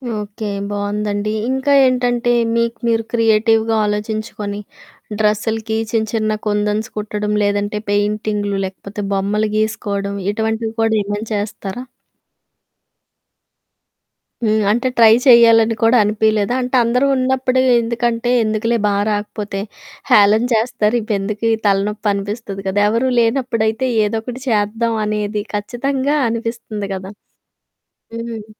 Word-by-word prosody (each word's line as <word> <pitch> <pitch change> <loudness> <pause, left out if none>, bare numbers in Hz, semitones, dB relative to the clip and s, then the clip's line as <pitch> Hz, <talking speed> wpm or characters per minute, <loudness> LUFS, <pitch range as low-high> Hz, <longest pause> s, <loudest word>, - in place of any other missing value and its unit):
Okay. 210 0 -5 0.2
బావుందండి. 205 +1 -2 0.2
ఇంక 265 +1 -2 0.2
ఏంటంటే 245 -1 +1 0.2
మీకు 235 0 0
మీరు 225 -1 +1
క్రియేటివ్‌గా 225 0 +2
ఆలోచించుకొని 210 -1 -3 0.6
డ్రెస్సులకి 220 +1 0
చిన్న 220 -2 0
చిన్న 215 -1 0
కుందన్స్ 210 +1 0
కుట్టడం 210 0 -2
లేదంటే, 205 +1 -1
పెయింటింగులు 205 0 -1
లేకపోతే, 195 +2 -7
బొమ్మలు 210 +2 0
గీసుకోవడం 200 -2 -2 0.2
ఇటువంటివి 220 +1 -2
కూడా 225 0 +2
ఏమైనా 205 +2 -4
చేస్తారా? 205 +2 -5 2.6
హ్మ్. 215 -1 +2
అంటే 240 +4 0
ట్రై 225 -1 +7
చేయాలని 230 -2 +6
కూడా 235 +2 +5
అనిపియలేదా? 215 +2 +1
అంటే 250 +1 -2
అందరూ 250 +4 +1
ఉన్నప్పుడు 260 0 +1 0.2
ఎందుకంటే 235 +1 -1
ఎందుకులే 220 +2 0
బా 205 - +1 0.2
రాకపోతే 205 -1 -4 0.5
హేాళన 215 -1 +5
చేస్తారు 225 0 +1
ఇవి 215 -1 -2
ఎందుకు 210 +3 -4
ఈ - - +3
తలనొప్పి 205 +2 +1
అనిపిస్తది 200 0 -5
కదా! 190 +2 0
ఎవరూ 235 +4 +1
లేనప్పుడైతే 230 0 0 0.2
ఏదో 220 +2 -1
ఒకటి 250 +2 -7
చేద్దాం 225 +2 0
అనేది 210 0 -2
ఖచ్చితంగా 265 +7 -1
అనిపిస్తుంది 230 -3 -4
గదా! 190 +1 -7 1.0
హ్మ్. 230 -2 -6
220 Hz, 110 wpm, -18 LUFS, 205-230 Hz, 2.6 s, ట్రై